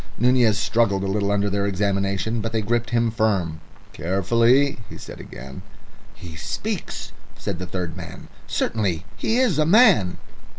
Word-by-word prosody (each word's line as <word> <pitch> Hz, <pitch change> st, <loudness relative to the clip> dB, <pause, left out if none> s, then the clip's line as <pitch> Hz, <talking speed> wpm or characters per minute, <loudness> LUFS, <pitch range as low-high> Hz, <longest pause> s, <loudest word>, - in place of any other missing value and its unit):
Nunez 120 Hz, -3 st, +3 dB
struggled 105 Hz, -4 st, +1 dB
a -, -, -1 dB
little 100 Hz, +1 st, 0 dB
under 100 Hz, 0 st, +1 dB
their 100 Hz, 0 st, 0 dB
examination, 100 Hz, +2 st, 0 dB
but 115 Hz, +1 st, -3 dB
they 110 Hz, -, +1 dB
gripped 115 Hz, +2 st, 0 dB
him 115 Hz, -1 st, +1 dB
firm. 95 Hz, -8 st, 0 dB, 0.3 s
"Carefully," 115 Hz, -, +2 dB
he -, -, -9 dB
said -, -, -10 dB
again. 65 Hz, +2 st, -9 dB, 0.5 s
"He 85 Hz, -3 st, -10 dB
speaks," 80 Hz, -, -4 dB, 0.3 s
said 85 Hz, -, -4 dB
the 90 Hz, -, -5 dB
third 90 Hz, -3 st, -4 dB
man. -, -, -9 dB, 0.2 s
"Certainly 95 Hz, -7 st, -1 dB
he 225 Hz, -, 0 dB
is 240 Hz, -, +2 dB
a -, -, +5 dB
man." 185 Hz, -, +5 dB
100 Hz, 155 wpm, -23 LUFS, 95-120 Hz, 0.5 s, a